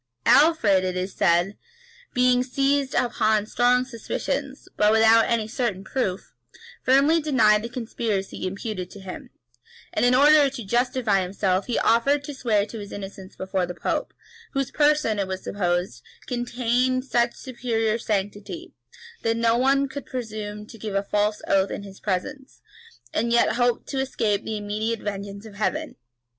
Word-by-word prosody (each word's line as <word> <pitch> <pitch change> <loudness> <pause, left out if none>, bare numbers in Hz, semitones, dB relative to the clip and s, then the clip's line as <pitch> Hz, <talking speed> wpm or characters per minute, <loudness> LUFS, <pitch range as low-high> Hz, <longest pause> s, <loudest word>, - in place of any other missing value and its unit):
Alfred, 240 - +5
it 185 0 -2
is 185 +1 -3
said, 175 +1 +2 0.6
being 250 0 +3
seized 275 +1 0
upon 215 -3 +2
strong 245 +3 +2
suspicions, 230 -4 -4
but 210 0 +4
without 225 +1 +6
any 230 -2 +1
certain 220 -5 -2
proof, 195 -5 -3 0.5
firmly 280 +5 +4
denied 220 -8 +4
the 235 - -5
conspiracy 225 -6 -3
imputed 195 -1 -5
to 205 - -12
him; 190 -1 -9 0.6
and, 215 - 0
in 245 +1 +5
order 290 +1 +6
to 260 -3 -7
justify 240 -2 +1
himself, 185 +1 -1
he 240 - -1
offered 275 +5 +3
to 290 - -6
swear 220 -6 +1
to 220 +1 -8
his 205 -1 -8
innocence 195 -1 -8
before 190 -1 -2
the 180 - -6
pope, - - -2 0.4
whose 275 -1 -1
person, 295 -8 +2
it 195 - -1
was 190 0 -5
supposed, 175 -9 -1 0.2
contained 250 +1 0
such 240 -2 +1
superior 230 -3 -2
sanctity, 205 - -4 0.5
that 225 0 0
no 230 0 +3
one 275 +3 +3
could 275 +1 -8
presume 215 -4 -5
to 225 +1 -13
give 210 -2 -5
a 195 - +1
false 210 +1 0
oath 195 0 +3
in - - -5
his 195 -1 -12
presence, 260 +8 -4 0.5
and 235 +2 0
yet 235 0 +4
hope 245 -1 +1
to 270 - -3
escape 225 -6 0
the 220 - -3
immediate 210 +2 -2
vengeance 200 0 -5
of 220 - -11
Heaven. 295 +10 -2
225 Hz, 155 wpm, -24 LUFS, 200-255 Hz, 0.6 s, without